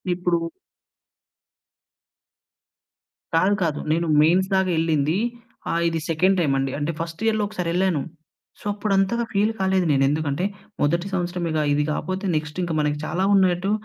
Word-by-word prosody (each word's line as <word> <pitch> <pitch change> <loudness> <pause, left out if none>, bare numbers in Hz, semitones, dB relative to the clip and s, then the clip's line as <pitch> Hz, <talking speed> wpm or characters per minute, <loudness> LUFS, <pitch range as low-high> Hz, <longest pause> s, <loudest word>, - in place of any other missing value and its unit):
ఇప్పుడు 175 -1 0 3.0
కాదు 190 +5 +3
కాదు. 155 -3 -1
నేను 170 +2 +1
మెయిన్స్ 180 +4 +4
దాక 190 0 +3
ఎళ్ళింది. 160 0 +1 0.5
ఆహ్, 170 - +1
ఇది 165 -1 -1
సెకండ్ 185 +4 +3
టైమ్ 145 -5 +2
అండి. 135 0 -1
అంటే, 150 +3 -1
ఫస్ట్ 165 +4 -5
ఇయర్‌లో 220 -1 +2
ఒకసారి 180 -5 -3
ఎళ్ళాను. 180 -4 +1 0.6
సో, - - -17
అప్పుడు 205 0 -1
అంతగా 195 +5 +1
ఫీల్ 210 +2 +2
కాలేదు 190 -1 +2
నేను. 135 -1 +3
ఎందుకంటే, 150 +3 -1 0.4
మొదటి 170 +5 +1
సంవత్సరమేగా 175 -3 -1
ఇది 150 +1 +2
కాకపోతే, 185 +5 -3
నెక్స్ట్ 150 +2 -5
ఇంకా 170 -2 -2
మనకి 150 0 0
చాలా 175 +5 -1
ఉన్నాయన్నట్టు 190 0 +3
175 Hz, 145 wpm, -23 LUFS, 155-190 Hz, 3.0 s, మెయిన్స్